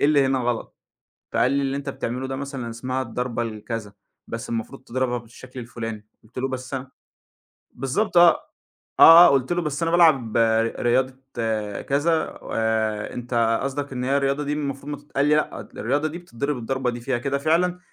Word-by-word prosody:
اللي 140 -1 +4
هنا 135 0 +1
غلط؟" 120 -2 -2 0.6
فقال 125 - +2
لي: 140 0 +1
"اللي 135 0 -1
أنت 140 0 -5
بتعمله 130 -1 -4
ده 135 - -3
مثلًا 135 -3 -5
اسمها 130 +3 -3
الضربة،" 120 0 -3
الكذا، 110 -1 -5 0.3
"بس - - -6
المفروض 120 +3 -4
تضربها 125 -1 -1
بالشكل 125 +2 -11
الفُلاني." 115 -3 -6 0.2
قُلت 110 +3 -18
له: 135 - 0
"بس 130 +1 -6
أنا" 130 0 -5 0.8
بالضبط 140 - -1
آه، 175 -1 +9 0.7
آه، 165 +2 +11
آه، - - +5
قُلت 135 +2 +1
له: 175 - 0
"بس 150 0 -3
أنا 165 - 0
بالعب 140 -10 +4
ر 115 0 +2
رياضة،" 130 +2 +2 0.7
كذا 160 +4 0
"و - - -9
آآ 110 -1 0
أنت 115 -2 0
قصدك 140 0 -3
إن 125 0 -3
هي 135 +2 +2
الرياضة 140 +1 0
دي 145 +1 -2
المفروض 140 -1 -4
ما 145 - -4
تت" 145 - -21
قال 140 - +4
لي: 150 +1 +4
"لأ، 150 - -1
الرياضة 145 +7 -2
دي 160 +3 -6
بتتضرب 140 -4 -4
الضربة 130 +2 -2
دي 120 0 -4
فيها 120 +1 -1
كده 140 +2 -1
فعلًا، 175 +5 +1
130 Hz, 185 wpm, -23 LUFS, 120-145 Hz, 0.8 s, آه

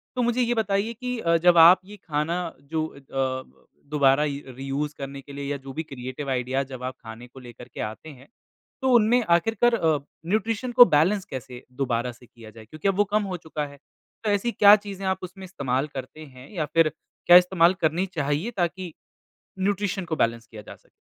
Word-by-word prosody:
तो 250 - 0
मुझे 240 +1 +1
ये 240 0 +1
बताइए 210 +1 0
कि 250 +2 -4
अ, 170 -4 +2
जब 175 +1 +4
आप 170 +3 +9
ये 210 +2 -12
खाना 165 +1 -2 0.2
जो 155 +2 -3
अ 140 - -14
ब, 130 -1 -4 0.2
दोबारा 140 -1 +4
य 140 -1 -4
री 135 - -7
यूज़ 145 +2 -2
करने 140 0 -7
के 140 - -13
लिए 140 0 -6
या 145 - -2
जो 135 - -8
भी 160 - -4
क्रिएटिव 135 0 -7
आइडिया 130 +1 -1
जब 125 -1 -8
आप 130 0 -4
खाने 110 +2 -10
को 130 +2 -14
लेकर 120 -1 -12
के - - -6
आते 110 +8 -10
हैं। 135 -3 -14 0.5
तो 265 - +2
उनमें 235 +2 +4
आखिरकार 225 +8 +3
अ, 160 -8 +1 0.3
न्यूट्रिशन 220 +5 -1
को 245 0 +9
बैलेंस 180 +4 +2
कैसे 130 -3 -8
दोबारा 125 -2 -1
से 120 +1 -18
किया 115 -2 -15
जाए? 110 0 -14
क्योंकि 155 - -5
अब 195 - +2
वो 205 - +5
कम 215 0 +3
हो 180 - -3
चुका 155 -2 -5
है। 140 0 -14 0.5
तो 215 - 0
ऐसी 205 +4 0
क्या 205 -2 +7
चीज़ें 200 -2 -7
आप 190 0 0
उसमें 190 +1 -8
इस्तेमाल 140 -6 -2
करते 135 +4 -8
हैं? 130 -1 -14
या 165 -6 -1
फिर 165 -1 +4 0.4
क्या 175 0 +10
इस्तेमाल 180 -1 +4
करनी 165 +4 +1
चाहिए 145 +8 -1
ताकि 175 -1 -2 0.7
न्यूट्रिशन 195 0 -1
को 160 -2 -3
बैलेंस 115 -3 0
किया 110 -3 -11
जा - - -12
सके? - - -31
160 Hz, 210 wpm, -25 LUFS, 135-195 Hz, 0.7 s, क्या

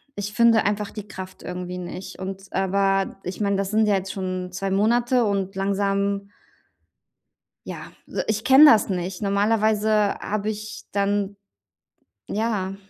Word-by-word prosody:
ich 205 0 -4
finde 230 +1 +4
einfach 205 0 -1
die 210 -2 -8
Kraft 190 -2 -9
irgendwie 180 0 -5
nicht. 180 +1 -7
Und 190 +1 -6
aber 195 +1 +1
ich 180 +4 -5
meine, 200 -1 +1
das 195 0 -2
sind 215 0 +3
ja 205 - +3
jetzt 195 0 -3
schon 185 -1 -4
2 195 +1 -3
Monate 235 +5 +2
und 195 -2 -1
langsam 200 0 0 1.4
ja, - - -8
so, - - -2
ich 215 0 -1
kenne 270 +3 +8
das 225 -9 +6
nicht. 180 0 -3
Normalerweise 210 +1 +2 0.3
habe 215 0 -2
ich 215 0 -6
dann 200 0 0 0.9
ja. 205 -3 -1
200 Hz, 145 wpm, -23 LUFS, 190-215 Hz, 1.4 s, kenne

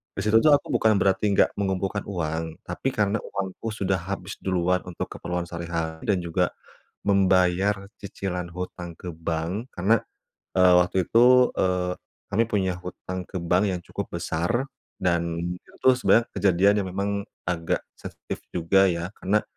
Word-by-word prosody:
Di - - -2
situ 110 +1 +4
tuh 155 - +6
aku 140 - -3
bukan 110 -1 +4
berarti 100 +2 +2
nggak - - +3
mengumpulkan 95 +1 -1
uang, 80 -3 -3
tapi 90 +9 -2
karena 105 0 +2
uangku 100 +3 -4
sudah 95 -3 0
habis 95 +1 -4
duluan 90 -1 +1
untuk 90 - -4
keperluan 90 0 -3
sehari-hari 85 -1 -4
dan 100 -4 +2
juga 85 +1 0 0.6
membayar 95 0 +3
cicilan 95 -3 -4
hutang 90 -1 -6
ke 90 - -6
bank. 85 +9 -3
Karena, 100 +6 +3 0.6
eee, 90 -1 +7
waktu 90 0 +1
itu, 125 +2 +6
eee, 90 -1 +1 0.4
kami 115 +3 +3
punya 95 -3 +1
hutang 90 0 -6
ke 95 - -4
bank 90 +4 +2
yang 90 - -1
cukup - - -6
besar 100 +12 -1 0.3
dan 85 -2 0 0.2
itu - - -23
tu 130 - +7
sebenarnya 120 -2 +4
kejadian 100 +1 +4
yang - - -5
memang 100 +2 -1 0.4
agak 85 -2 -1
sensitif - - -8
juga 95 +3 +3
ya 85 +2 -3
karena, 105 +3 +1
95 Hz, 155 wpm, -25 LUFS, 85-100 Hz, 0.6 s, eee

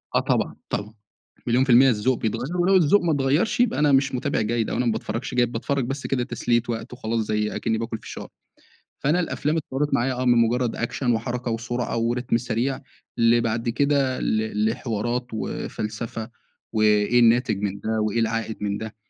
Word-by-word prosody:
آه - - +5
طبعًا. - - 0
طبعًا. 105 +1 -3 0.5
مليون 125 +3 +3
في 135 - -4
المِيِّة 130 +3 +7
الذوق 120 +2 +1
بيتغيّر، 120 +10 -2
ولو 185 +2 +3
الذوق 185 +3 +5
ما 170 -2 +1
اتغيّرش، 145 - +1
يبقى 245 -10 +2
أنا 150 -1 +4
مش 135 -1 +3
مُتابع 125 - -1
جيد، 115 +1 0
أو - - -2
أنا 125 - 0
ما 115 - +2
باتفرّجش 115 +2 -4
جيد، 120 -1 +2
باتفرّج 130 +2 -1
بس 135 +2 -4
كده 125 -2 0
تسلية 120 -2 0
وقت 115 +1 -4
وخلاص، 115 -2 -2
زي 105 0 -1
أكنّي 110 -1 -1
باكل 115 0 -3
فشار. - - -8 0.7
فأنا 155 +6 +2
الأفلام 160 -2 -1
اتطوّرت 145 -1 -2
معايا 130 0 +1
آه، 125 +1 -2
من 120 -1 +4
مُجرّد 120 +1 +2
أكشن، 120 +2 -1
وحركة، 120 +1 -2
وسرعة، 120 +1 -2
وريتم 120 +1 0
سريع 125 +3 -2 0.4
لبعد 115 0 +2
كده 140 0 +1
ل 110 -1 0
لحوارات، 120 +2 -2
وفلسفة، 110 +1 -4 0.4
وإيه 110 +2 +3
الناتج 120 -2 +4
من 100 -1 -2
ده، 110 +1 -1
وإيه 110 +2 0
العائد 115 -1 -1
من 100 0 -1
ده. 110 -1 -7
120 Hz, 180 wpm, -24 LUFS, 110-130 Hz, 0.7 s, المِيِّة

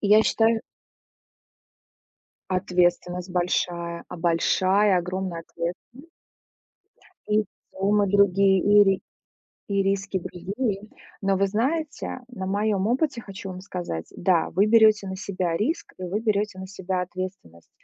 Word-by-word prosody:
и 200 - +1
я 215 +1 +7
считаю 225 0 +2 1.9
Ответственность 180 -1 0
большая, 175 -1 -1
а, - - -7
большая 185 +3 +3
огромная 180 -1 -4
ответственность. 235 - -6 1.2
И 210 0 +3 0.3
суммы 200 +1 +1
другие 195 -1 +4
и 205 0 +6
ри 195 -1 +1 0.7
и 200 -1 +1
риски 195 -1 -1
другие, 195 +4 -3 0.4
но 195 0 +2
вы 195 +1 +2
знаете 275 +6 -2
на 190 -7 -6
моём 200 0 0
опыте 255 +1 0
хочу 195 -2 -8
вам 185 0 -7
сказать. 175 - -5
Да 175 -2 +2
вы 195 +5 +3
берёте 215 -2 +5
на 190 - -4
себя 185 -3 -2
риск, 260 - -2
и 185 - -5
вы 195 +5 -2
берёте 210 -3 0
на 190 - -7
себя 190 -1 -3
ответственность, 185 - -7
195 Hz, 130 wpm, -25 LUFS, 180-210 Hz, 1.9 s, я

